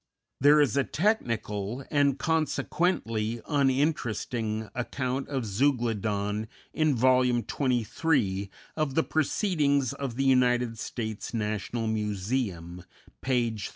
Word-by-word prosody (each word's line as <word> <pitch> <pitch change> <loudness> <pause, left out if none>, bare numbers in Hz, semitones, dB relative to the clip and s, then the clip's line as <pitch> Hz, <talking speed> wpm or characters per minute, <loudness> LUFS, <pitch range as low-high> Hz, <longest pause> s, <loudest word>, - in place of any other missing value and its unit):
There 145 +2 +6
is 140 -7 +3
a 140 - +3
technical 120 - -1
and, 145 -2 +3
consequently, 145 -8 0
uninteresting 130 -6 0
account 130 +2 -3
of 135 -4 -2
Zeuglodon 110 -3 0 0.3
in 155 -3 +2
Vol. 130 +2 +4
XXIII. 120 -3 0 0.3
of 155 -4 -1
the 160 - +3
"Proceedings 150 - +1
of 135 -4 -5
the 135 +2 0
United 125 -3 +3
States 110 0 -5
National 110 +1 -2
Museum," 100 -4 -2 0.4
page 120 -5 0
327. - - -10
125 Hz, 105 wpm, -28 LUFS, 110-140 Hz, 0.4 s, There